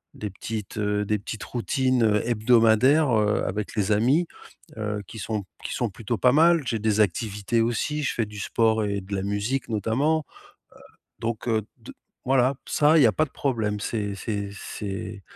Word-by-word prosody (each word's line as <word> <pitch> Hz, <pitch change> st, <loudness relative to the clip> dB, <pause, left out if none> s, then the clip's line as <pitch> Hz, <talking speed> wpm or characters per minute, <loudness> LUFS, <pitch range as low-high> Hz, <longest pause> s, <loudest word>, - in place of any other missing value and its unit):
des 105 Hz, -, -5 dB
petites, 105 Hz, +1 st, -6 dB
heu, 105 Hz, -1 st, 0 dB
des 105 Hz, +1 st, 0 dB
petites 105 Hz, +2 st, -6 dB
routines, 130 Hz, 0 st, 0 dB
heu, 105 Hz, 0 st, +2 dB
hebdomadaires, 120 Hz, +5 st, +4 dB
heu, 105 Hz, 0 st, +1 dB
avec 105 Hz, +2 st, -4 dB
les 105 Hz, -1 st, 0 dB
amis, 135 Hz, +11 st, +2 dB, 0.5 s
heu, 105 Hz, -1 st, -3 dB
qui 110 Hz, -, -9 dB
sont 105 Hz, -1 st, -3 dB, 0.2 s
qui -, -, -4 dB
sont 120 Hz, -3 st, -1 dB
plutôt 110 Hz, +3 st, -4 dB
pas 125 Hz, +7 st, +4 dB
mal. 165 Hz, +1 st, +5 dB
J'ai 115 Hz, -2 st, -1 dB
des 110 Hz, 0 st, +2 dB
activités 105 Hz, +3 st, 0 dB
aussi, 120 Hz, +6 st, -1 dB
je 130 Hz, -, 0 dB
fais 115 Hz, -, 0 dB
du 105 Hz, 0 st, -10 dB
sport 110 Hz, +1 st, +1 dB
et 100 Hz, -1 st, -2 dB
de 95 Hz, +2 st, -9 dB
la 95 Hz, -, -1 dB
musique 105 Hz, +8 st, -2 dB
notamment, 130 Hz, +9 st, 0 dB
heu, -, -, -21 dB, 0.8 s
donc 115 Hz, 0 st, -3 dB
heu, 110 Hz, -2 st, +2 dB, 0.2 s
d -, -, -11 dB, 0.4 s
voilà, 130 Hz, 0 st, +3 dB
ça, 150 Hz, +2 st, +4 dB
il -, -, +6 dB
y -, -, +8 dB
a 110 Hz, -, +3 dB
pas 155 Hz, -, +1 dB
de 135 Hz, -, -20 dB
problème, 110 Hz, -6 st, -1 dB
c'est 105 Hz, -2 st, -2 dB
c'est 100 Hz, 0 st, -3 dB
c'est 100 Hz, 0 st, -6 dB
110 Hz, 190 wpm, -25 LUFS, 105-125 Hz, 0.8 s, y